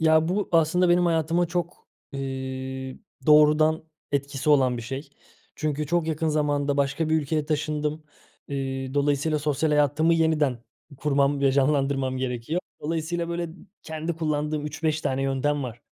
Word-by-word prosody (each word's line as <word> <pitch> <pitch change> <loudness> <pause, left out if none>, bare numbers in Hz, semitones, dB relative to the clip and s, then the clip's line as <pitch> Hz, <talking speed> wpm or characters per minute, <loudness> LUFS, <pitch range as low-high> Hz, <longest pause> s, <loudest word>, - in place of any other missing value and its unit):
Ya, 160 0 +4
bu, 195 +2 -1
aslında, 165 +2 +3
benim 175 0 +4
hayatıma 165 +1 +1
çok, 175 +1 -4 0.2
eee, 130 -1 -5 0.3
doğrudan 155 +1 +5 0.3
etkisi 140 +1 -1
olan 130 -4 +4
bir 120 - -5
şey. 135 +5 -6 0.5
Çünkü 150 -1 -2
çok 170 +1 +1
yakın 160 0 0
zamanda 145 -2 +1
başka 140 +3 0
bir 160 - +3
ülkeye 150 +1 -1
taşındım. 150 0 -2 0.4
Eee, 135 -1 -3
dolayısıyla, 145 +2 +1
sosyal 150 +1 0
hayatımı 150 +3 +3
yeniden 155 -6 +2 0.4
kurmam 140 0 +1
ve 135 -1 +3
canlandırmam 135 -1 +1
gerekiyor. 130 +6 -2 0.2
Dolayısıyla, 165 +2 -2
böyle, 170 0 -2
ı 165 -1 -8 0.3
kendi 160 +1 -4
kullandığım 150 -1 -1
3-5 155 +1 -1
tane 135 -3 -1
yöntem 135 +2 0
var. 120 -2 -7
150 Hz, 145 wpm, -25 LUFS, 135-160 Hz, 0.5 s, doğrudan